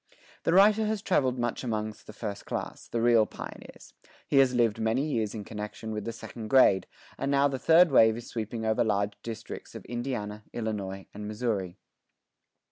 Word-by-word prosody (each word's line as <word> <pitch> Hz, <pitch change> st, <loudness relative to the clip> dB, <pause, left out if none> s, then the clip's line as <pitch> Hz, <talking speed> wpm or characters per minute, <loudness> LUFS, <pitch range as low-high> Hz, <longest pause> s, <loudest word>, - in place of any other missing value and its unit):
The 165 Hz, -, +3 dB
writer 210 Hz, +3 st, +5 dB
has 215 Hz, -1 st, -2 dB
traveled 130 Hz, -, +1 dB
much 120 Hz, +1 st, -2 dB
amongst 110 Hz, -3 st, -4 dB
the -, -, -8 dB
first 105 Hz, -2 st, -6 dB
class, -, -, -5 dB
the 115 Hz, -1 st, -2 dB
real 115 Hz, -3 st, +5 dB
pioneers. -, -, -10 dB, 0.3 s
He 140 Hz, -, +1 dB
has 130 Hz, -2 st, +5 dB
lived 115 Hz, -2 st, +2 dB
many 115 Hz, +5 st, +1 dB
years 115 Hz, -8 st, -1 dB
in 105 Hz, -, -5 dB
connection 105 Hz, +1 st, -6 dB
with 105 Hz, -1 st, -4 dB
the 115 Hz, -, -2 dB
second 115 Hz, 0 st, -8 dB
grade; 105 Hz, -7 st, +5 dB, 0.3 s
and 140 Hz, -, -1 dB
now 140 Hz, 0 st, +4 dB
the 135 Hz, -2 st, -3 dB
third 165 Hz, +2 st, +6 dB
wave 110 Hz, -3 st, +6 dB
is 120 Hz, -, -8 dB
sweeping 110 Hz, 0 st, -4 dB
over 110 Hz, +1 st, +2 dB
large 100 Hz, -2 st, 0 dB
districts 115 Hz, 0 st, -8 dB
of -, -, -8 dB
Indiana, 120 Hz, -4 st, -4 dB
Illinois, 100 Hz, -4 st, -4 dB
and 105 Hz, 0 st, -6 dB
Missouri. 105 Hz, -5 st, -2 dB
115 Hz, 180 wpm, -28 LUFS, 105-130 Hz, 0.3 s, third